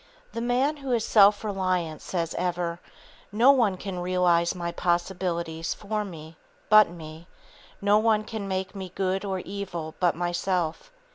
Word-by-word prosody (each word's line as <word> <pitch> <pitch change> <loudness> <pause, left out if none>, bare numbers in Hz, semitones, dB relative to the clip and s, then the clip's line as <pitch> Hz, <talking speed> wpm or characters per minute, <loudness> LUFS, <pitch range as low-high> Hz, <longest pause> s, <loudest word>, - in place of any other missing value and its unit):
The 230 - -3
man 255 +5 +1
who 275 -2 -5
is 230 -2 +1
self 205 -1 +5
reliant 185 -6 -1
says 170 -3 -3
ever: 175 -1 -2 0.5
"No 235 +6 +6
one 225 -9 +2
can 190 -1 -5
realize 175 -1 +2
my 170 -1 -3
possibilities 170 -2 -2
for 210 0 -3
me, 160 -4 -10 0.3
but 215 -3 +7
me; 165 0 -10 0.6
no 205 +1 +5
one 215 -1 +2
can 215 -2 -6
make 190 0 -3
me 190 -2 -6
good 190 0 -1
or 190 -2 -3
evil 180 -5 -6
but 175 -3 +2
myself." 175 - -2
185 Hz, 150 wpm, -26 LUFS, 170-210 Hz, 0.6 s, but